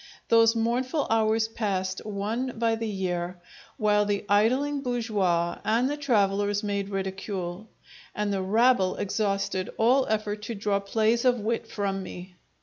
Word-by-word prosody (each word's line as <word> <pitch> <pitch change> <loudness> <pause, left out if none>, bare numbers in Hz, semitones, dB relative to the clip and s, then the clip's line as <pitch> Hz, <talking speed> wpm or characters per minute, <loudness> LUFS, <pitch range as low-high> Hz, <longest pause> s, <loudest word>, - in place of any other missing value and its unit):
Those 230 0 +5
mournful 250 +6 0
hours 220 0 +2
passed, 190 -4 -2
one 220 +5 -3
by 230 0 +2
the 225 0 -2
year, 180 -3 -3 0.4
while 210 -1 +3
the 205 0 -1
idling 260 +8 +2
bourgeois 205 -9 0
and 230 +4 +2
the 290 - -1
travellers 205 -6 +1
made 200 -1 -2
ridicule; 190 0 -4 0.5
and 210 -1 -1
the 195 - -1
rabble 215 0 +3
exhausted 195 -2 -1
all 255 +4 +3
effort 215 -1 -1
to 225 +2 -5
draw 200 -1 0
plays 220 +3 +1
of 250 -2 +3
wit 225 +2 -2
from 195 -2 -2
me. 180 0 -9
210 Hz, 145 wpm, -27 LUFS, 195-230 Hz, 0.5 s, Those